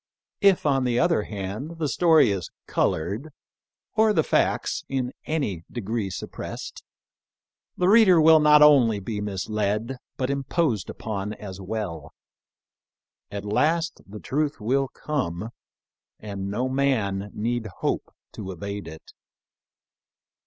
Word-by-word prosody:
If, 195 -4 +4
on 135 -3 +2
the 120 -1 +1
other 125 - +3
hand, 105 - -5
the 160 -2 -1
story 160 - +4
is 95 -4 -3 0.2
col - - +1
ored 100 - -4 0.7
or 220 -1 +4
the 160 - +3
facts - - 0
in 130 -2 -1
any 135 - -2
degree 110 -3 -3
suppressed, 95 - -7 0.9
the 180 - +2
reader 200 -4 +7
will 160 0 +7
be - - +1
not 150 0 +8
only 125 -8 +6
misled, 105 +3 -2 0.2
but 130 +1 -1
imposed 140 - 0
upon 105 -1 -4
as 95 -2 -8
well. 95 -6 -5 1.1
At 100 0 -6
last 160 +10 +1
the 105 +2 -9
truth 145 +3 -1
will 135 +5 +1
come, 110 - -3 0.7
and 100 -2 -5
no 120 +6 -1
man 115 -8 0
need 115 +1 -2
hope - - -1 0.2
to 95 - -7
evade 100 +1 -6
it. 80 0 -11
115 Hz, 125 wpm, -25 LUFS, 100-150 Hz, 1.1 s, not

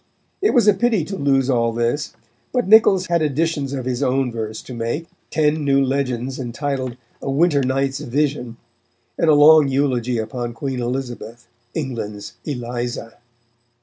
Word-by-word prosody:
It 410 -5 +2
was 235 -4 +4
a 210 - +7
pity 220 -4 +1
to 195 - -5
lose 135 -4 +2
all 120 -3 +2
this, 120 +6 -1 0.4
but 250 -4 0
Niccols 200 -3 +6
had 170 -2 +1
additions 150 -1 0
of 135 -3 -4
his 125 -1 -2
own 130 0 +1
verse 110 -1 -5
to 130 - -9
make; 120 +7 -3 0.2
ten 155 0 +1
new 140 -1 +3
legends 130 -1 -2
entitled 130 0 -3 0.2
"A - - -4
Winter 145 +1 +3
Night's 135 +1 0
Vision," 140 -3 -2 0.6
and 165 - +1
a 155 - +6
long 150 0 +7
eulogy 130 -3 0
upon 120 +2 -4
Queen 130 +1 -3
Elizabeth, 120 -2 -5 0.3
"England's 110 -8 -5
Eliza." 120 -4 -4
135 Hz, 150 wpm, -21 LUFS, 120-150 Hz, 0.6 s, a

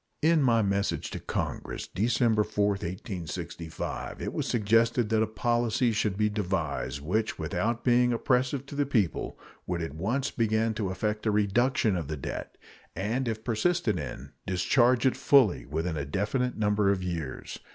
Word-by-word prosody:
In 160 0 +5
my 115 -4 +4
message 100 0 -1
to - - -4
Congress - - -4
December 110 +2 +2
4, 105 0 +1
1865, 90 -3 -5
it - - -4
was - - -2
suggested 115 +1 +2
that 110 -1 +2
a 110 - +2
policy 120 +2 +1
should 105 -3 0
be 105 0 +3
devised 100 -8 -2
which, 105 +9 -1
without 90 +10 -1
being 125 0 +4
oppressive 130 +3 +1
to 140 - -9
the 145 -1 +1
people, 110 - 0 0.3
would 90 -1 -1
at 80 - -5
once 115 - -1
begin 110 -1 +1
to 105 -3 -2
effect 105 +3 -2
a - - +4
reduction 105 +2 +2
of 85 -5 -3
the 75 0 -4
debt, 65 - -6 0.4
and, 120 +6 -1
if 110 -1 -3
persisted 120 - +1
in, 75 - -7 0.2
discharge 120 +7 +3
it 130 - +3
fully 130 - +4
within 80 +4 -2
a 70 - -2
definite 110 - -1
number 105 -1 +2
of 95 -2 -1
years. 85 -7 -5
110 Hz, 160 wpm, -28 LUFS, 95-120 Hz, 0.4 s, In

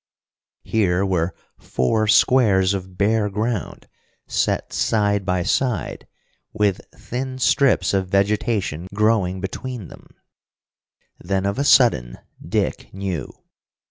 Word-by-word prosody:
Here 95 -3 +1
were 90 -2 -1 0.2
four 110 - 0
squares 105 -4 +4
of 95 -2 -6
bare 105 +1 +2
ground 105 +1 -3 0.4
set - - -1
side 100 -3 +1
by 90 -1 +1
side, 120 -2 -1 0.5
with 105 -3 +1
thin 130 +1 -5
strips 135 -1 +2
of 95 -1 0
vegetation 100 -3 0
growing 105 -4 +1
between 110 +1 -6
them. - - -15 1.1
Then 95 +2 -2
of 100 +5 -1
a - - +2
sudden 65 - +4 0.3
Dick - - -2
knew! 95 -7 -4
100 Hz, 110 wpm, -21 LUFS, 95-110 Hz, 1.1 s, squares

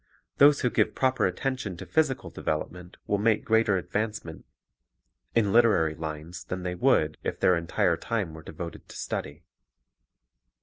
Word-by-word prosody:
Those 145 0 +7
who 125 - +1
give - - +1
proper 130 -4 +2
attention 110 -1 -3
to - - -8
physical 150 -5 0
development 90 +3 -4
will 100 - 0
make 110 0 +2
greater 110 -1 +3
Mental 90 -2 -1
Effect - - -29
advancement 105 -6 -3 0.9
in 105 -4 +2
literary 110 -10 +4
lines 80 +3 -6
than 90 0 -5
they 90 0 -2
would 90 - +2
if - - -3
their 90 - +4
entire 85 -1 +1
time 105 -8 -2
were 80 - -9
devoted 85 +2 -8
to - - -10
study. - - -5
95 Hz, 160 wpm, -27 LUFS, 85-115 Hz, 0.9 s, Those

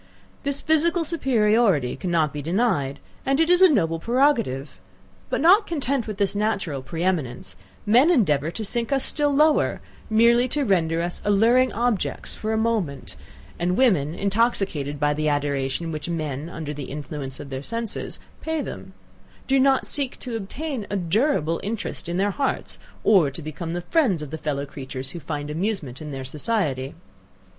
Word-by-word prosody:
This 280 0 -1
physical 330 +2 +2
superiority 220 - +2
cannot 160 -2 0
be 145 - -4
denied 145 - 0 0.2
and 270 +2 +1
it 325 +2 +3
is 360 +1 +5
a 375 - +9
noble 165 - +1
prerogative! 230 - +1 0.5
But - - -1
not 390 +7 +6
content 275 -7 -1
with 210 -2 -5
this 200 -1 0
natural 200 -9 -1
pre 165 +5 -5
eminence, 130 - -2 0.3
men 245 +9 +5
endeavour 160 - +3
to 215 +5 -4
sink 235 +5 0
us 270 -1 +1
still 295 -1 +1
lower, 300 +2 +3 0.3
merely 235 +3 +4
to 290 +3 0
render 165 -5 +1
us 175 0 -4
alluring 230 +5 +4
objects 235 -2 -1
for 220 - -3
a 220 - +1
moment; 220 -11 -1 0.4
and 180 +1 0
women, 175 - +3
intoxicated 195 - 0
by 145 0 +2
the 155 +1 0
adoration 145 +2 -1
which 155 +2 -5
men, 155 -2 -3
under 160 -4 -5
the 145 -2 -6
influence 140 -1 -6
of 140 - -9
their 130 0 -4
senses, 230 +7 -3 0.2
pay 320 0 -2
them, - - -8 0.5
do 270 0 +3
not 270 0 +3
seek 275 -3 -2
to 245 -3 -4
obtain 240 +3 -4
a 205 - -2
durable 175 - +1
interest 210 -4 -4
in 175 - -1
their 200 +2 +2
hearts, 275 +7 -2 0.2
or 185 -9 +5
to 145 +4 -8
become 155 +2 -5
the 175 - -2
friends 195 - +1
of 150 - -8
the 160 - -5
fellow 145 -2 -2
creatures 130 -2 -7
who 175 - -7
find 150 -1 -5
amusement 160 - -3
in 150 -1 -6
their 135 -1 -5
society. 145 - -2
190 Hz, 170 wpm, -24 LUFS, 150-245 Hz, 0.5 s, a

